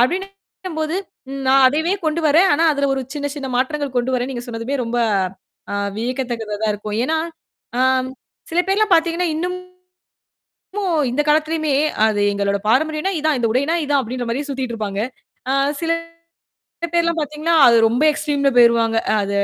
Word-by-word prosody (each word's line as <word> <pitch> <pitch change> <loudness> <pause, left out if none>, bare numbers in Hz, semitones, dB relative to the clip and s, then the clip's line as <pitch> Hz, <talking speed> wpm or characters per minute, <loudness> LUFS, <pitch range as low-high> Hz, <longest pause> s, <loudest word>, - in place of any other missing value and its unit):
அப்பிடின்னும்போது, 365 +1 -2 0.3
ம் 275 0 -5
நான் 270 0 +6
அதைவே 315 +6 0
கொண்டுவரேன். 315 +3 +3
ஆனா, 325 +3 +2
அதுல 280 -1 0
ஒரு 265 - -2
சின்ன, 285 -1 -3
சின்ன 275 -2 -5
மாற்றங்கள் 275 +1 -1
கொண்டுவரேன்னு 250 +1 0
நீங்கச் 245 -1 -7
சொன்னதுவே 235 +4 -3
ரொம்ப 235 +1 -2 0.7
அ - - -1 0.2
வியக்கத்தக்கதா 240 -2 -3
தான் 215 - +2
இருக்கும். 210 +1 -5
ஏன்னா, 320 +5 0 0.6
அ - - +2 0.7
சில 340 +2 +2
பேர்லாம் 415 +1 +2
பார்த்தீங்கன்னா, 335 +1 +1
இன்னுமும் 360 +2 -3 1.5
இந்தக் 295 +4 -1
காலத்துலயுமே 310 0 +1 0.3
அது 210 -2 +1
எங்களோட 200 0 0
பாரம்பரியம்னா 315 - +1
இதுதான், 310 -2 +1
இந்த 235 - +1
உடைனா 280 +6 +1
இதுதான் 285 -1 +1
அப்பிடின்ற 245 +1 -4
மாரி 275 +5 -2
சுத்திட்டு 260 -3 -3
இருப்பாங்க. 205 -2 -4 0.5
ஆ - - +2 0.3
சில 330 - 0 1.0
பேர்லாம் 335 -1 +1
பார்த்தீங்கன்னா, 305 +3 -1
அது 235 - +6
ரொம்ப 245 +6 0
எக்ஸ்ட்ரீம்ல 290 -2 0
போயிருவாங்க. 230 -1 +4 0.2
அத, 200 0 -3
280 Hz, 145 wpm, -20 LUFS, 240-320 Hz, 1.5 s, நான்